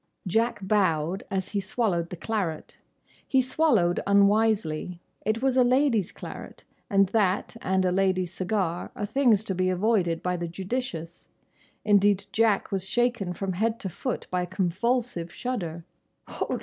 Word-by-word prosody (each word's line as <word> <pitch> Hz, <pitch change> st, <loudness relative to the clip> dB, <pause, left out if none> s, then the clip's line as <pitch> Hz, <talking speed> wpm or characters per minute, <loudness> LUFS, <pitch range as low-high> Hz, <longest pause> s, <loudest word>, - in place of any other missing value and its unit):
Jack 225 Hz, +5 st, +1 dB
bowed 185 Hz, -3 st, +1 dB
as 190 Hz, -1 st, -2 dB
he 205 Hz, -, -1 dB
swallowed 190 Hz, -4 st, -1 dB
the -, -, -6 dB
claret. 180 Hz, -4 st, -3 dB, 0.5 s
He 265 Hz, -, +3 dB
swallowed 260 Hz, -, +2 dB
unwisely. 200 Hz, -4 st, +2 dB, 0.3 s
It 220 Hz, +3 st, 0 dB
was 265 Hz, -1 st, +2 dB
a 255 Hz, -, +6 dB
lady's 250 Hz, -, +2 dB
claret, -, -, -9 dB, 0.3 s
and 195 Hz, -3 st, +3 dB
that 205 Hz, 0 st, +1 dB
and 190 Hz, 0 st, +1 dB
a 180 Hz, -, +2 dB
lady's 185 Hz, -1 st, +1 dB
cigar 185 Hz, -3 st, -2 dB
are 205 Hz, -, -3 dB
things 220 Hz, -2 st, +3 dB
to 200 Hz, -, -2 dB
be 185 Hz, 0 st, +1 dB
avoided 185 Hz, -3 st, +1 dB
by 180 Hz, 0 st, 0 dB
the 170 Hz, 0 st, -3 dB
judicious. 180 Hz, -2 st, -5 dB, 0.6 s
Indeed 205 Hz, -1 st, +4 dB
Jack 220 Hz, -3 st, +2 dB
was 190 Hz, -1 st, -2 dB
shaken 240 Hz, -6 st, 0 dB
from 190 Hz, +1 st, -3 dB
head 220 Hz, +5 st, 0 dB
to 190 Hz, -, -3 dB
foot 245 Hz, +8 st, -4 dB
by 180 Hz, 0 st, 0 dB
a 180 Hz, -, -3 dB
convulsive 190 Hz, +1 st, -1 dB
shudder. 170 Hz, -10 st, -4 dB
195 Hz, 150 wpm, -26 LUFS, 180-225 Hz, 0.6 s, a